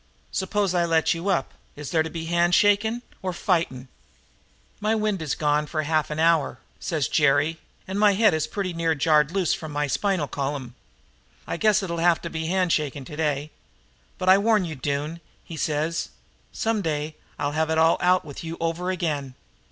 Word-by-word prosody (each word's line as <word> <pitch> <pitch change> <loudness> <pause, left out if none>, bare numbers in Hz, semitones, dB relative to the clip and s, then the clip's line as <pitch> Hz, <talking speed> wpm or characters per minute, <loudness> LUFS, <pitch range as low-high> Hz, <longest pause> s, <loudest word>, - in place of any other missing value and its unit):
'S'pose 195 0 0
I 175 -1 +2
let 165 -1 +2
you 170 +4 -3
up. 170 -8 0 0.2
Is 150 +1 -7
it 160 - +4
to 160 - -2
be 165 0 -5
a - - -6
handshaking 205 +7 +3 0.2
or 185 - -2
fighting?' 165 -8 -1 0.9
"'My 215 +1 +1
wind 215 -4 0
is 155 -3 -2
gone 150 0 +1
for 155 0 -2
half 155 0 0
an 150 - -4
hour,' 165 -1 +2 0.2
says 155 -7 -1
Jerry, 150 +2 +2 0.3
'and 190 +2 -3
my 210 -1 +5
head 215 0 +4
is 155 -1 0
pretty 195 -3 -3
near 165 -1 0
jarred 150 0 +3
loose 185 -3 +1
from 155 -2 -5
my 145 0 0
spinal 185 +1 0
column. 135 -3 -4 0.7
I - - -3
guess 215 +1 +3
it'll 170 -3 -3
have 170 0 +4
to 170 - -5
be 160 0 -3
hand 185 -1 +1
shaking 145 -3 -2
today. 150 0 -2 0.7
But 185 - -4
I 190 +1 +7
warn 215 -2 +3
you, 160 - -5
Doone,' 145 +4 -3 0.2
he 165 - -9
says, 155 +2 -1 0.4
'someday 160 -9 -1 0.2
I'll 145 0 -1
have 160 +1 0
it 160 - +1
all 160 +1 +4
out 180 -1 +3
with 145 +1 -8
you 165 +1 -5
over 165 +2 -2
again.' 150 -8 -2
165 Hz, 185 wpm, -25 LUFS, 150-185 Hz, 0.9 s, I